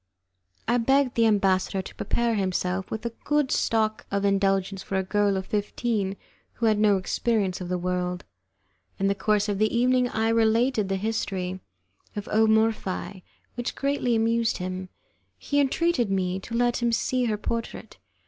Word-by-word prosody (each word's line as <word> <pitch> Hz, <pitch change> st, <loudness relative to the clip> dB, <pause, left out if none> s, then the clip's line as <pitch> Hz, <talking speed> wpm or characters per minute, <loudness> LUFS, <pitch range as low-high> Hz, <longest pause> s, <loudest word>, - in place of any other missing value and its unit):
I 240 Hz, +2 st, +3 dB
begged 270 Hz, +2 st, +2 dB
the 230 Hz, -1 st, +3 dB
ambassador 195 Hz, -2 st, +1 dB
to -, -, -10 dB
prepare 235 Hz, -1 st, 0 dB
himself 190 Hz, -2 st, -1 dB
with 220 Hz, +1 st, -5 dB
a 235 Hz, -, -1 dB
good 295 Hz, -2 st, +1 dB
stock 215 Hz, -1 st, 0 dB
of 200 Hz, 0 st, -1 dB
indulgence 195 Hz, -1 st, +1 dB
for 195 Hz, -, -5 dB
a 190 Hz, -, +1 dB
girl 205 Hz, 0 st, +1 dB
of 190 Hz, -, -4 dB
fifteen 205 Hz, -1 st, -1 dB, 0.4 s
who 235 Hz, -, -2 dB
had 215 Hz, -2 st, +3 dB
no 210 Hz, -2 st, +4 dB
experience 190 Hz, 0 st, -1 dB
of 180 Hz, -, -5 dB
the 180 Hz, -, 0 dB
world. 180 Hz, 0 st, -2 dB, 0.7 s
In 195 Hz, -, -1 dB
the 195 Hz, -, +3 dB
course 205 Hz, +1 st, +1 dB
of 200 Hz, -1 st, -1 dB
the 215 Hz, 0 st, +2 dB
evening 250 Hz, +1 st, +2 dB
I 220 Hz, 0 st, 0 dB
related 225 Hz, -1 st, +2 dB
the 195 Hz, -, +1 dB
history 190 Hz, -3 st, -2 dB, 0.6 s
of 205 Hz, -1 st, -5 dB
O 220 Hz, +1 st, +4 dB
Morphi, 220 Hz, -3 st, 0 dB, 0.3 s
which 240 Hz, 0 st, -4 dB
greatly 275 Hz, -4 st, 0 dB
amused 230 Hz, 0 st, +1 dB
him. 185 Hz, 0 st, -5 dB, 0.5 s
He 285 Hz, -, -1 dB
entreated 285 Hz, -3 st, +1 dB
me 185 Hz, -1 st, 0 dB
to 230 Hz, +4 st, -7 dB
let 240 Hz, 0 st, +2 dB
him 235 Hz, 0 st, +2 dB
see 250 Hz, +2 st, 0 dB
her 215 Hz, -3 st, 0 dB
portrait. 230 Hz, +2 st, -5 dB
215 Hz, 165 wpm, -26 LUFS, 195-235 Hz, 0.7 s, no